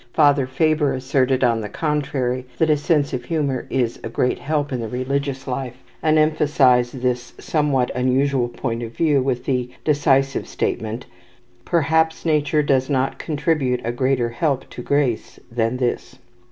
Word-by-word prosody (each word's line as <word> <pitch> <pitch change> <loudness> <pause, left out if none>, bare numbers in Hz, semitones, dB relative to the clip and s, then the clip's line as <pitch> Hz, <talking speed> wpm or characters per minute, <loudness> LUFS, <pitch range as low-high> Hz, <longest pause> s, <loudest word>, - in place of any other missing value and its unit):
Father 145 -4 +4
Faber 150 0 +1
asserted, 130 0 +1
on 115 -2 +2
the 105 - -5
contrary, 135 -3 -1
that 160 -1 +3
a - - +5
sense 150 -1 +1
of 125 -1 -3
humour 140 -4 -1
is 120 -3 -1
a - - -4
great 125 +2 0
help 145 -2 -1
in 125 - -1
the 115 - -3
religious 135 +2 -2
life, 125 -1 -4 0.2
and 155 0 +3
emphasized 135 -5 +3
this 125 -1 -1
somewhat 145 -5 0
unusual 130 0 +1
point 120 -1 -3
of 115 -1 -6
view 150 -5 +3
with 130 -2 -2
the 125 -2 -1 0.2
decisive 135 -2 +2
statement: 110 +2 -3 0.6
"Perhaps 160 0 +1
nature 150 -1 +2
does 135 -1 +1
not 135 -1 0
contribute 145 -4 0
a 120 - -1
greater 125 -1 0
help 135 +3 -1
to - - -7
grace 135 -3 -1
than 115 +1 0
this." 125 -2 -2
135 Hz, 155 wpm, -21 LUFS, 125-150 Hz, 0.6 s, a